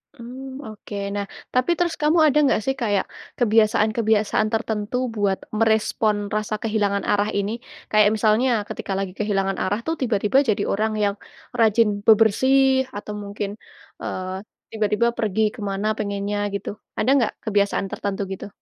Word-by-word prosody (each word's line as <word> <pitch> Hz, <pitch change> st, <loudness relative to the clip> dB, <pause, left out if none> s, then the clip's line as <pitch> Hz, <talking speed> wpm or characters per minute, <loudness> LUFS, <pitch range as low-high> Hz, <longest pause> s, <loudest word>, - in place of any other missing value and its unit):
Mmm, 260 Hz, +3 st, -9 dB
oke 215 Hz, -1 st, -9 dB, 0.2 s
nah 200 Hz, 0 st, -2 dB, 0.3 s
tapi 255 Hz, +6 st, +2 dB
terus 345 Hz, -2 st, 0 dB
kamu 305 Hz, +3 st, +3 dB
ada 295 Hz, 0 st, +2 dB
nggak 265 Hz, -, +2 dB
sih 270 Hz, -, 0 dB
kayak 205 Hz, -4 st, +1 dB, 0.3 s
kebiasaan-kebiasaan 215 Hz, -1 st, +2 dB
tertentu 220 Hz, 0 st, -1 dB, 0.2 s
buat 200 Hz, -2 st, +1 dB, 0.2 s
merespon 215 Hz, -1 st, +1 dB
rasa 215 Hz, 0 st, -1 dB
kehilangan 205 Hz, -3 st, 0 dB
arah 205 Hz, +1 st, +2 dB
ini? 200 Hz, +1 st, 0 dB, 0.4 s
Kayak 215 Hz, -1 st, +5 dB
misalnya 220 Hz, +4 st, +3 dB, 0.2 s
ketika 195 Hz, -, -5 dB
lagi 195 Hz, -2 st, -3 dB
kehilangan 195 Hz, -2 st, 0 dB
arah 205 Hz, +3 st, 0 dB
tuh 325 Hz, -, 0 dB
tiba-tiba 220 Hz, -1 st, +1 dB
jadi 205 Hz, -1 st, +1 dB
orang 215 Hz, +2 st, 0 dB
yang 200 Hz, -1 st, +1 dB, 0.4 s
rajin 225 Hz, 0 st, +4 dB, 0.2 s
bebersih 260 Hz, +5 st, +4 dB
atau 205 Hz, +1 st, -6 dB
mungkin, 200 Hz, 0 st, -4 dB, 0.5 s
eee, 185 Hz, 0 st, -4 dB, 0.4 s
tiba-tiba 215 Hz, +1 st, +1 dB
pergi 215 Hz, -1 st, 0 dB
ke -, -, -13 dB
mana 195 Hz, +2 st, -2 dB
pengennya 200 Hz, 0 st, -2 dB, 0.2 s
gitu? 200 Hz, -, -4 dB, 0.3 s
Ada 240 Hz, -, +1 dB
nggak 240 Hz, -, +1 dB
kebiasaan 200 Hz, -2 st, +1 dB
tertentu 200 Hz, 0 st, -3 dB
gitu? 190 Hz, -, -6 dB
215 Hz, 145 wpm, -23 LUFS, 205-230 Hz, 0.5 s, Kayak